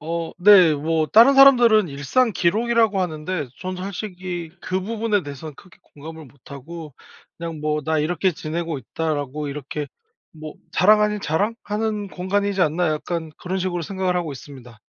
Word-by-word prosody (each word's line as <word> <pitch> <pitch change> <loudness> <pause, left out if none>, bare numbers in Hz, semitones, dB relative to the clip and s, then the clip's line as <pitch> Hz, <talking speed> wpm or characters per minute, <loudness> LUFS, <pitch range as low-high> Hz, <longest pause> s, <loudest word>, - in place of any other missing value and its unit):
어. 165 +1 -4
네. 180 -4 +7
뭐 155 +2 0
다른 235 - +6
사람들은 240 -7 +6
일상 145 - 0
기록이라고 220 +3 +1
하는데 155 -3 -3
전 185 -1 -5
솔직히 180 -3 -6
그 185 +1 -2
부분에 215 0 -1
대해서는 145 +1 -8
크게 185 +5 -18
공감을 160 +1 -11
못하고 140 +4 -11 0.4
그냥 165 -2 -6
뭐 150 0 -1
'"나 160 +1 0
이렇게 175 +4 0
지내고 160 0 -4
있다."라고 145 +2 -4
이렇게 145 +1 -5 0.5
뭐 155 -1 -9 0.2
자랑 210 +3 +4
아닌 210 0 0
자랑? 195 +7 -1
하는 210 -1 -3
공간이지 195 +2 -1
않나?' 170 +1 +1
약간 160 +1 -4
그런 185 +2 -3
식으로 175 -2 -2
생각을 185 +1 -2
하고 165 -4 -2
있습니다. 130 -4 -12
170 Hz, 350 characters per minute, -22 LUFS, 155-200 Hz, 0.5 s, 네